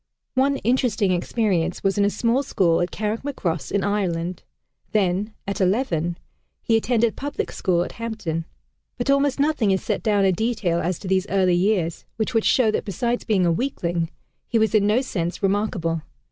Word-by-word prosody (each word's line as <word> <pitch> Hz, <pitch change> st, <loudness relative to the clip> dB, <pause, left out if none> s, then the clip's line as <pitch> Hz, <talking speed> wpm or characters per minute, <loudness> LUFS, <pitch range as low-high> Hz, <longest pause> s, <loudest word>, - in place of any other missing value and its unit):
One 275 Hz, +2 st, +2 dB
interesting 235 Hz, -6 st, +1 dB
experience 180 Hz, -2 st, 0 dB
was 195 Hz, 0 st, +2 dB
in 200 Hz, -1 st, +3 dB
a -, -, +3 dB
small 230 Hz, +5 st, +1 dB
school 175 Hz, -11 st, +2 dB
at 175 Hz, -, 0 dB
Carrickmacross 215 Hz, -, -3 dB
in 200 Hz, -, +1 dB
Ireland; 180 Hz, -4 st, -1 dB, 0.5 s
then, 205 Hz, +1 st, +1 dB
at 200 Hz, 0 st, -2 dB
eleven, 180 Hz, -5 st, +1 dB, 0.5 s
he 225 Hz, -, +2 dB
attended 230 Hz, 0 st, +2 dB
public 285 Hz, +1 st, -3 dB
school 175 Hz, -3 st, +1 dB
at -, -, -6 dB
Hampton. 215 Hz, -9 st, -4 dB, 0.5 s
But 245 Hz, +3 st, +1 dB
almost 280 Hz, 0 st, +2 dB
nothing 285 Hz, -7 st, +2 dB
is 190 Hz, -1 st, +1 dB
set -, -, -1 dB
down 205 Hz, -3 st, +2 dB
in 190 Hz, -, +4 dB
detail 210 Hz, -4 st, 0 dB
as 175 Hz, +1 st, -1 dB
to 195 Hz, -, -9 dB
these 190 Hz, +1 st, +1 dB
early 190 Hz, -2 st, +3 dB
years, 175 Hz, -2 st, +1 dB
which 225 Hz, +2 st, -2 dB
would 225 Hz, -1 st, +2 dB
show 235 Hz, -4 st, +4 dB
that -, -, -1 dB
besides 235 Hz, +5 st, -2 dB
being 200 Hz, -5 st, +2 dB
a 170 Hz, -, +3 dB
weakling, 170 Hz, -6 st, -1 dB, 0.4 s
he 230 Hz, -, +1 dB
was 220 Hz, 0 st, +2 dB
in 205 Hz, -2 st, +4 dB
no 220 Hz, +5 st, +3 dB
sense 175 Hz, -8 st, -3 dB
remarkable. 190 Hz, -5 st, 0 dB
205 Hz, 175 wpm, -23 LUFS, 180-230 Hz, 0.5 s, in